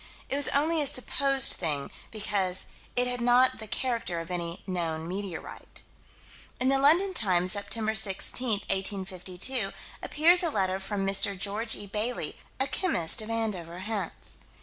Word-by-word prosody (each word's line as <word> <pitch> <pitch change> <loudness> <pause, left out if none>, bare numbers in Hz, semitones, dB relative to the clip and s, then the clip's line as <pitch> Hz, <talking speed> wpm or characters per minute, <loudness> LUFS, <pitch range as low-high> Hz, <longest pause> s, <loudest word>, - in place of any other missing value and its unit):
It - - 0
was 285 0 +4
only 310 +3 +2
a 290 - +5
"supposed" 275 0 +3
thing, 150 -5 -2 0.2
because 195 -4 -1 0.3
"It 245 - +4
had 250 0 -1
not 245 +1 +4
the 220 - -7
character 230 -7 -1
of 165 +2 -7
any 170 -1 -4
known 165 -4 -3
meteorite." 190 -1 -6 0.8
In 255 - +2
the 270 0 +3
London 340 +8 +4
Times, 185 - +2
Sept. 205 -1 -6 0.2
16, 220 +4 -1 0.2
1852, 195 +3 -1 0.3
appears 340 +4 +4
a 340 - +1
letter 190 -7 0
from 195 0 -3
Mr. 195 0 +2
George 210 +4 +1
E. 205 - -6
Bailey, 210 -4 -3 0.2
a 265 - +3
chemist 260 - 0
of 215 - -7
Andover, 200 -7 -3
Hants. 200 -3 -5
210 Hz, 150 wpm, -28 LUFS, 185-255 Hz, 0.8 s, a